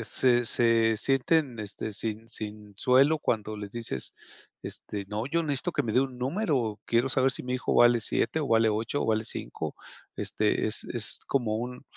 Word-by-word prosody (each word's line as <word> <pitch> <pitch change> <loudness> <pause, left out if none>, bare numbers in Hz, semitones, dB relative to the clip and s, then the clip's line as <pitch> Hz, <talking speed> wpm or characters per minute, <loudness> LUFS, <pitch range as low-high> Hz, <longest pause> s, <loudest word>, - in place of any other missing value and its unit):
eh, - - -5
se 120 +1 +2
se 115 -1 +3
sienten, 135 +2 +1
este, 105 +1 -5
sin 110 +2 -4
sin 105 -2 -7
suelo 135 +7 +4
cuando 110 -6 -2
les 105 -1 -7
dices, 115 - -3 0.5
este: 100 -1 -6
"No, 110 +3 -3
yo 170 +4 0
necesito 155 +3 0
que 145 - 0
me 115 -4 -3
dé 125 - +4
un 130 -2 -3
número, 130 - -1
quiero 120 +3 +2
saber 130 0 +3
si - - -3
mi 125 0 -3
hijo 130 - -1
vale 120 0 +6
7 160 +7 +1
o 145 - -3
vale 115 0 +4
8 110 +6 -1
o - - -2
vale 110 0 +1
5". - - -5 0.4
Este, - - 0
es - - +2
es - - +1
como 120 -6 0
un 125 +3 -5
120 Hz, 190 wpm, -28 LUFS, 110-135 Hz, 0.5 s, vale